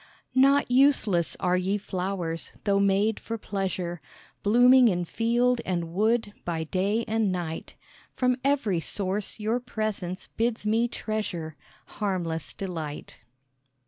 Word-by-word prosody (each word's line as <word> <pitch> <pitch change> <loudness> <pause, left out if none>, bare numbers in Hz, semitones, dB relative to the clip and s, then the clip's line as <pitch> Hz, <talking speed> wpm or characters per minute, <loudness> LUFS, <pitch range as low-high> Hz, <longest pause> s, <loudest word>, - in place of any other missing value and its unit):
"Not 275 0 +4
useless 245 - +3
are 180 0 +2
ye 185 +3 +1
flowers, 185 -4 -4
though 200 -2 +2
made 200 +2 +2
for 230 - -5
pleasure, 185 -5 -3 0.4
Blooming 245 +4 +6
in 180 -4 +1
field 240 +5 +1
and 170 -3 -2
wood 215 +2 +1
by 165 -2 -2
day 195 +7 0
and 220 -2 +1
night; 170 -3 -4 0.4
From 250 -1 +2
every 265 -10 +1
source 195 +5 -3
your 220 +3 0
presence 215 -6 -4
bids 230 -1 -2
me 225 +3 +2
treasure 205 -9 -4 0.3
Harmless 175 -6 -3
delight." 165 -6 -6
200 Hz, 120 wpm, -27 LUFS, 180-230 Hz, 0.4 s, Blooming